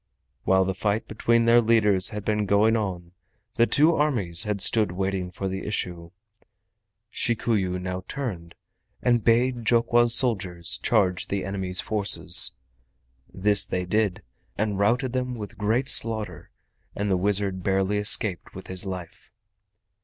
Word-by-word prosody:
While 95 0 +2
the 95 - -2
fight 105 +3 -3
between 115 +2 0
their 120 +1 +5
leaders 105 -5 +2
had 105 -1 -8
been 105 -1 -1
going 105 +3 +2
on 90 -6 -5 0.5
the 115 - +3
two 155 +3 +3
armies 115 - -1
had 105 -1 -3
stood 105 0 +2
waiting 95 0 -3
for 95 +2 -6
the 95 0 -5
issue. 90 -5 -4 1.0
Shikuyu 105 -6 -1
now 90 0 -6
turned 95 -12 -7 0.5
and 120 -3 +1
bade 120 +1 +1
Jokwa's 120 +1 +3
soldiers 95 -9 -1
charge 95 -5 0
the 100 -1 -4
enemy's 95 -2 -2
forces. 105 -2 +6 0.8
This 100 +1 +2
they 90 0 -4
did, 105 0 -1 0.3
and 105 -2 -2
routed 120 +5 0
them 125 -1 -3
with 105 -3 -10
great 115 +6 -1
slaughter, 110 - +1 0.5
and 100 0 -3
the - - +2
wizard 100 0 -1
barely 95 +2 -1
escaped 105 -2 +1
with 95 - -10
his 95 +1 -5
life. 90 -3 -9
100 Hz, 140 wpm, -24 LUFS, 95-115 Hz, 1.0 s, forces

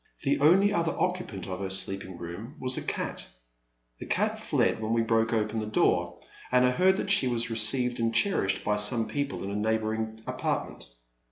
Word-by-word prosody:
The 140 0 +1
only 190 +8 +4
other 170 -2 0
occupant 180 - -3
of 90 -1 -5
her 95 -1 -4
sleeping 95 -1 0
room 90 - -8
was 130 0 +2
a - - -3
cat. - - -4 0.7
The - - -8
cat - - 0
fled - - 0
when 110 +1 -1
we 115 0 +2
broke 115 0 +1
open 110 -1 -1
the 110 - -4
door, 110 - +1 0.3
and 125 0 +4
I 125 - +3
heard 185 +7 +3
that 195 - -1
she 195 -10 +4
was 120 -1 -1
received 120 +3 +2
and 115 0 +1
cherished 115 - +1
by 105 0 0
some 110 +2 +3
people 140 +6 -3
in 100 - -4
a - - -4
neigh 110 +2 +1
boring 110 0 -4
apartment. - - -4
115 Hz, 195 wpm, -27 LUFS, 105-135 Hz, 0.7 s, only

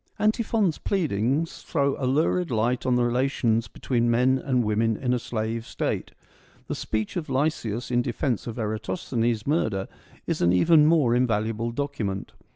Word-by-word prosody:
Antiphon's 215 -4 +1
pleadings 150 - -1
throw 140 -3 0
a - - +2
lurid 165 +5 +1
light 120 +2 0
on 125 - +3
the 125 - +2
relations 120 -2 +1
between 120 -2 -1
men 125 +3 +3
and 130 -2 +1
women 110 +1 +1
in 125 -1 0
a 125 - +1
slave 115 0 -3
State; - - -3 0.6
the - - -4
speech 110 -1 -3
of 165 -5 -3
Lysias 130 -5 -1
in 120 0 +3
defence 125 -2 -2
of 115 - -5
Eratosthenes' 110 +1 -2
murder 110 - 0 0.4
is - - -2
an 85 - +4
even 150 - +5
more 155 -7 +4
invaluable 115 -2 0
document. 115 -7 -3
120 Hz, 155 wpm, -25 LUFS, 110-140 Hz, 0.6 s, even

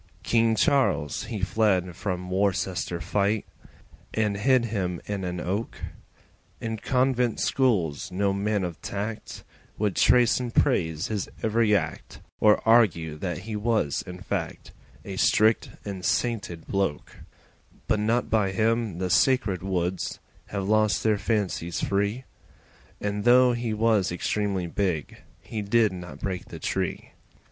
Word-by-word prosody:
King 115 -1 +3
Charles 125 - +1
he 110 -3 -5
fled 95 -4 +1
from 90 -1 -4
Worcester 95 -2 0
fight 100 +5 0 0.7
And 105 -2 +1
hid 125 +4 +3
him 95 -6 -2
in 100 -2 -3
an 90 -1 -3
Oak; 100 +6 -3 0.8
In 110 -1 -3
convent 125 0 +1
schools 95 - +1
no 100 +2 +1
man 100 0 0
of 85 -2 -5
tact 105 +2 -5 0.3
Would 105 -3 0
trace 120 -1 +4
and 125 -2 -3
praise 80 +1 +1
his 105 -3 -2
every 110 -1 +3
act, 80 -6 -3 0.2
Or 105 +1 +4
argue 90 -9 +4
that 90 +1 -4
he 110 -1 -4
was 105 -8 0
in 90 0 -7
fact - - -4 0.3
A - - -6
strict 110 +1 +3 0.2
and 95 -3 -5
sainted 105 -10 -1
bloke, 95 -7 -2 0.7
But 110 -2 +2
not 115 +3 +1
by 100 -4 +1
him 110 -2 0
the 90 0 -2
sacred 105 -3 +3
woods 90 -1 -2 0.3
Have 100 -2 -3
lost 110 -1 +2
their 110 -2 +2
fancies 95 -6 -1
free, 100 +5 0 0.8
And 105 0 -2
though 125 +1 +6
he 120 -1 -2
was 110 -3 +2
extremely 95 +1 -1
big 85 -3 -2 0.2
He 110 - -5
did 110 +1 +3
not 85 -5 -9
break 95 -3 -3
the - - -9
tree. - - -3
100 Hz, 135 wpm, -26 LUFS, 90-115 Hz, 0.8 s, though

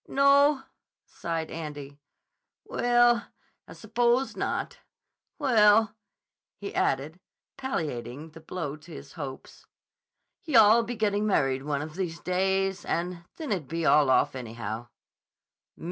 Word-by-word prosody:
"No?" 280 0 +4 0.4
sighed 165 -1 -4
Andy. 145 -3 -7 0.7
"Well, 240 -1 +3 0.4
I - - -11
s'pose 240 +4 0
not. - - -3 0.6
Well," 220 -6 +4 0.6
he 200 - -7
added, 145 +6 -1 0.4
palliating 155 - -4
the 165 - -12
blow 155 -3 -5
to 160 +3 -16
his 145 -2 -10
hopes, 140 -5 -9 0.8
"yah'll 235 - +6
be 240 +1 -5
gettin' 210 -1 0
married 135 -9 +1
one 145 0 -2
of 155 0 -8
these 175 -2 -4
days, 190 +1 0
and 170 0 -3
then 310 -6 -5
it'd 175 -9 -2
be 165 0 -3
all 150 -3 +5
off, 130 - +3
anyhow." 115 -2 -6
180 Hz, 115 wpm, -27 LUFS, 145-230 Hz, 0.8 s, yah'll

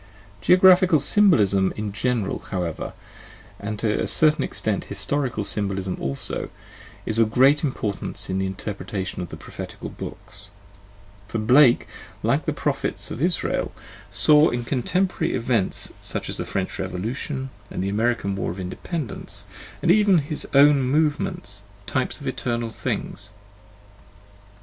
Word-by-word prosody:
Geographical 185 -2 +6
symbolism 110 - +4
in 105 -1 -4
general, 115 -1 -1
however, 90 -4 -3 0.7
and 105 +1 -4
to 105 0 0
a - - -1
certain 155 0 +5
extent - - -1
historical 135 -7 -1
symbolism 95 -2 0
also, 70 0 -3 0.6
is 110 +1 +2
of 115 -1 +4
great 135 +6 +4
importance 110 -8 -2
in 95 0 -1
the 95 - 0
inter 95 +2 -4
pretation 95 -1 -5
of 90 - -5
the - - -8
prophetical - - -8
books: - - -8 0.8
for 110 - -3
Blake, 125 +4 +5 0.4
like - - +1
the - - 0
prophets - - -1
of - - -5
Israel, 175 +1 0 0.4
saw 150 +1 +6
in 120 0 -2
contemporary 160 +7 0
events 115 -5 -1
such - - -5
as - - -3
the - - -3
French 95 0 -3
Revolution 115 +9 -3 0.2
and - - -4
the 95 - -1
American 110 -1 0
war 100 - -2
of 90 +3 -6
Independence, 120 - -4 0.4
and - - +5
even 205 0 +5
in 165 - +4
his 150 0 -2
own 140 0 +7
move 145 +3 +2
ments, 100 0 -3 0.2
types 130 +5 -2
of 145 - -10
eternal 120 -3 -2
things. 105 -1 -4
120 Hz, 140 wpm, -23 LUFS, 100-145 Hz, 0.8 s, own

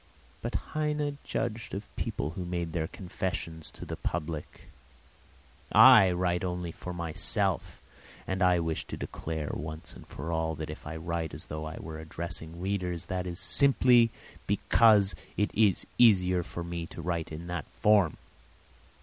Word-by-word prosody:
But - - -4 0.2
Heine 150 -2 -1
judged 110 -3 -3
of 100 +2 -8
people 75 - -3
who 90 +2 -5
made 85 -2 -3
their 80 -2 -1
confessions 85 -4 -4
to - - -10
the - - -5
public. 80 -2 -4 1.1
I 115 -8 +9
write 90 0 0
only 90 -2 -3
for 90 - -7
myself, 85 -3 0 0.5
and 95 +1 -2
I 90 -1 +5
wish 80 -1 -1
to - - -6
declare 80 -2 -4
once 80 +2 -6
and - - -13
for 80 +5 -6
all 80 -1 -1
that 75 +1 -5
if 75 - -10
I 80 - -5
write 80 0 -3
as - - -6
though 75 +1 -5
I 80 0 -6
were 80 -1 -7
addressing 80 +1 -6
readers, 90 -2 -2
that 90 0 -2
is 90 +1 -4
simply 125 +2 +5 0.4
because 105 -4 +5 0.2
it 105 +1 +1
is 105 -3 +3
easier 90 -6 +5
for 85 0 -6
me 85 -1 -5
to - - -9
write 85 -3 -2
in 80 +2 -6
that 85 -5 -4
form. 100 -7 +4
85 Hz, 160 wpm, -29 LUFS, 80-95 Hz, 1.1 s, I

